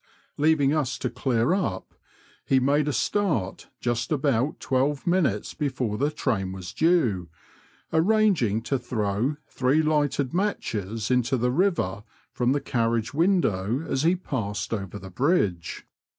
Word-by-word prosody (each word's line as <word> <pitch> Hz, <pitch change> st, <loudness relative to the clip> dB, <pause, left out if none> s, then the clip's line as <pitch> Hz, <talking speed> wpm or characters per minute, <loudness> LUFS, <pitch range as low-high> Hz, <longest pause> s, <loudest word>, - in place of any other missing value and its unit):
Leaving 145 Hz, -2 st, +3 dB
us 140 Hz, -5 st, 0 dB
to 125 Hz, -, -3 dB
clear 120 Hz, +3 st, +1 dB
up, 145 Hz, -, -2 dB, 0.5 s
he 135 Hz, -, +3 dB
made 145 Hz, +3 st, +2 dB
a -, -, +1 dB
start 140 Hz, -, -1 dB
just 120 Hz, +1 st, -2 dB
about 140 Hz, -2 st, +1 dB
twelve 135 Hz, +2 st, 0 dB
minutes 170 Hz, -, +1 dB
before 130 Hz, -7 st, -2 dB
the 140 Hz, +7 st, +1 dB
train 115 Hz, -11 st, -1 dB
was 95 Hz, -2 st, -7 dB
due, 120 Hz, -, +2 dB, 0.6 s
arranging 165 Hz, -, +3 dB
to 135 Hz, +3 st, -1 dB
throw 115 Hz, +2 st, -1 dB
three 135 Hz, +5 st, +1 dB
lighted 145 Hz, -3 st, +1 dB
matches 115 Hz, -, -2 dB
into 125 Hz, +1 st, +2 dB
the 125 Hz, +1 st, +1 dB
river 140 Hz, -, 0 dB, 0.3 s
from 125 Hz, 0 st, +1 dB
the 145 Hz, -, +2 dB
carriage 115 Hz, -3 st, -1 dB
window 145 Hz, -, +1 dB
as 130 Hz, -, 0 dB
he 170 Hz, +4 st, +3 dB
passed 115 Hz, -, -3 dB
over 100 Hz, -2 st, -4 dB
the 95 Hz, -2 st, -10 dB
bridge. 100 Hz, -, 0 dB
130 Hz, 135 wpm, -25 LUFS, 110-155 Hz, 0.6 s, Leaving